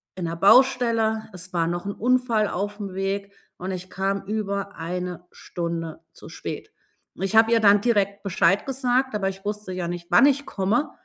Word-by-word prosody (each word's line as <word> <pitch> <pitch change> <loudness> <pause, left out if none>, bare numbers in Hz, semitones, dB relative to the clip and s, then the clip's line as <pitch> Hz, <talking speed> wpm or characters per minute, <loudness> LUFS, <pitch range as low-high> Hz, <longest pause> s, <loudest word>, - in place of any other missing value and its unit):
in 180 - -4
'ner 165 0 -3
Baustelle. 225 +1 +4
Es 180 0 -7
war 165 -1 +1
noch 175 +2 -3
'n 200 - -3
Unfall 240 -2 +1
aufm 205 0 -4
Weg 195 +1 -2 0.3
und 185 +2 -5
ich 185 0 -6
kam 195 +1 -1
über 200 -1 -3
1 180 +1 -5
Stunde 170 -2 -5
zu - - -13
spät. - - -7 0.4
Und 190 - -6
ich 195 +3 -1
habe 225 +1 +6
ihr 230 - +5
dann 205 -1 +5
direkt 205 -4 +1
Bescheid 195 +1 +2
gesagt, 260 -1 0
aber 195 -2 0
ich 195 0 -9
wusste 210 -2 -4
ja 180 -2 -3
nicht, 175 -1 -6
wann - - +7
ich 285 0 +2
komme 215 +10 0
200 Hz, 185 wpm, -24 LUFS, 185-225 Hz, 0.4 s, wann